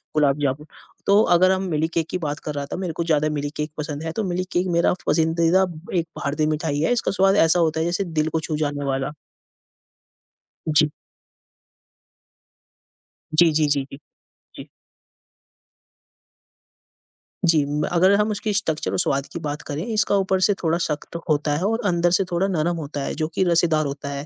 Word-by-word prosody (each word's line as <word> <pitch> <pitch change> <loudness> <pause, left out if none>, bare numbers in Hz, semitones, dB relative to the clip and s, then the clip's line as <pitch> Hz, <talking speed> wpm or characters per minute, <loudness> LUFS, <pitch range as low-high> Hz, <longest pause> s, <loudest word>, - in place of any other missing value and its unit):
गुलाब 145 -2 +3
जामुन। 140 +1 -1 0.4
तो 200 +1 +5
अगर 185 +2 +5
हम 190 0 0
मिल्क 160 +1 0
केक 165 -1 0
की - - -2
बात 150 -4 -4
कर 150 - -3
रहा 140 0 -3
था - - -2
मेरे 180 -3 -3
को 170 - -2
ज़्यादा 155 -2 +1
मिल्क 145 -1 -3
केक 150 0 -3
पसंद 150 0 -4
है, 165 - -3
तो 220 - -2
मिल्क 185 -1 -2
केक 180 +1 0
मेरा 170 0 +3
पसंदीदा 165 +3 +3 0.3
एक 165 - -3
भारतीय 150 +2 -1
मिठाई 155 -1 -1
है, 160 - +1
इसका 245 - +1
स्वाद 195 0 +3
ऐसा 165 +2 +3
होता 160 -1 +1
है 160 - 0
जैसे 175 +3 0
दिल 160 -4 -1
को 160 - -1
छू 155 0 -3
जाने 145 -2 -2
वाला। 135 +1 -2 1.6
जी। 150 0 +5 2.5
जी, 165 +1 +6
जी, 155 0 +2
जी, 145 -1 +1
जी। 135 - -9 0.6
जी। - - -9 2.8
जी, 165 -3 +4
म 145 +1 -2
अगर 180 +3 +4
हम 210 +1 +1
उसकी 210 +1 -2
स्ट्रक्चर 165 -7 -1
और - - -1
स्वाद 140 -5 +1
की - - -4
बात 150 -1 -4
करें, 150 +2 -5
इसका 210 -1 +2
ऊपर 190 -1 +1
से 205 - +4
थोड़ा 165 0 +2
सख्त 155 -2 -4
होता 150 -1 +1
है 160 - -2
और 225 +3 0
अंदर 175 -2 +2
से 185 +2 +3
थोड़ा 175 +3 +1
नरम 175 -2 0
होता 145 -2 -5
है, - - -3
जो 155 0 -1
कि - - +2
रसेदार 165 -3 +2
होता 140 0 -5
है। 140 0 -5
160 Hz, 185 wpm, -22 LUFS, 150-175 Hz, 2.8 s, जी